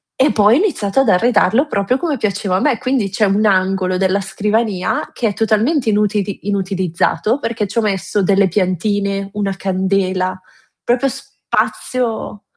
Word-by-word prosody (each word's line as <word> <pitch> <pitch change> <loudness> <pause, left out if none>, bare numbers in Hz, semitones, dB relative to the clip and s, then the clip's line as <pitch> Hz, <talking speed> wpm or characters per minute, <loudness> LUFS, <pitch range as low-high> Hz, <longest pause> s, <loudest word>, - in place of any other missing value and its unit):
e 265 -1 +3
poi 210 +2 +4
ho - - +4
iniziato 270 - 0
ad 265 - 0
arredarlo 225 +6 +3
proprio 200 +2 0
come 300 -3 -2
piaceva 200 -2 -1
a - - 0
me; 275 -6 +2
quindi 255 -6 0
c'è 210 +2 +1
un 205 +2 +1
angolo 185 -1 +1
della 190 +1 +1
scrivania 205 0 -1
che 230 -3 -1
è - - -4
totalmente 225 +5 +1
inutili 205 -1 -1
inutilizzato, 190 - -1
perché 230 -4 -2
ci 215 +4 -8
ho - - +2
messo 205 0 -1
delle 195 +1 +3
piantine, 195 +2 -1
una 200 -2 -2
candela, 185 -1 -1 0.4
proprio 245 +3 +1
spazio 230 -4 -3
205 Hz, 155 wpm, -17 LUFS, 190-225 Hz, 0.4 s, poi